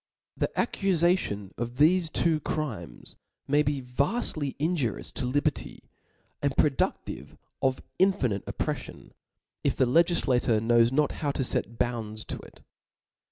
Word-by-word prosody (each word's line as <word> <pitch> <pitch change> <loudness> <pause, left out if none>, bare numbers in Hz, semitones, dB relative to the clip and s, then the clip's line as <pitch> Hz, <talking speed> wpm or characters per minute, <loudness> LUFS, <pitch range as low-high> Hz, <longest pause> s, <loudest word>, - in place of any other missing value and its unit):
The - - 0
accufation 175 - +1
of 120 +1 -3
thefe 165 +4 +4
two 165 -2 +2
crimes 145 - -5 0.3
may 145 +2 +4
be 145 -2 -1
vaftly 140 - -1
injurioMS 150 -7 -1
to 125 - -2
liber 140 +2 +2
ty, - - -9 0.6
and 140 -1 0
productive 145 -3 0 0.2
of 130 -1 0 0.2
infinite 135 - +2
oppreffion, - - -4 0.5
if - - +1
the 130 - +3
legiflator 130 -6 +3
knows 115 +1 +4
not 150 +2 +2
how 145 - 0
to 135 - -1
fet 115 -2 -2
bounds 110 -3 -2
to - - -5
it. - - -15
135 Hz, 130 wpm, -28 LUFS, 120-155 Hz, 0.6 s, thefe